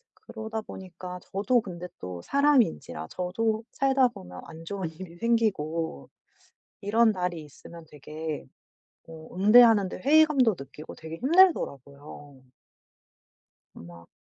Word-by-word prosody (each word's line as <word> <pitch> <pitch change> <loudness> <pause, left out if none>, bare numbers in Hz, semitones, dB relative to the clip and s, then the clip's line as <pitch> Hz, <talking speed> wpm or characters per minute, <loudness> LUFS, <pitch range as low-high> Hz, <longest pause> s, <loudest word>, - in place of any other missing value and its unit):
그러다 220 -1 -7
보니까 180 -3 -9
저도 210 +5 0
근데 180 -3 -8
또 90 -1 -7
사람인지라 260 - +1
저도 215 +5 -2
살다 270 -1 +3
보면 90 - -11
안 165 +1 -12
좋은 190 -2 -4
일이 170 +1 -11
생기고 170 - -1 0.7
이런 220 +2 +3
날이 180 -3 -3
있으면 160 +3 -13
되게 150 +1 -6 0.6
어 160 -1 -11
응대하는데 210 0 +5
회의감도 280 - +4
느끼고 150 +3 -10
되게 160 0 -9
힘들더라고요. 145 - +1 1.4
막 85 0 -13
180 Hz, 260 characters per minute, -27 LUFS, 155-230 Hz, 1.4 s, 응대하는데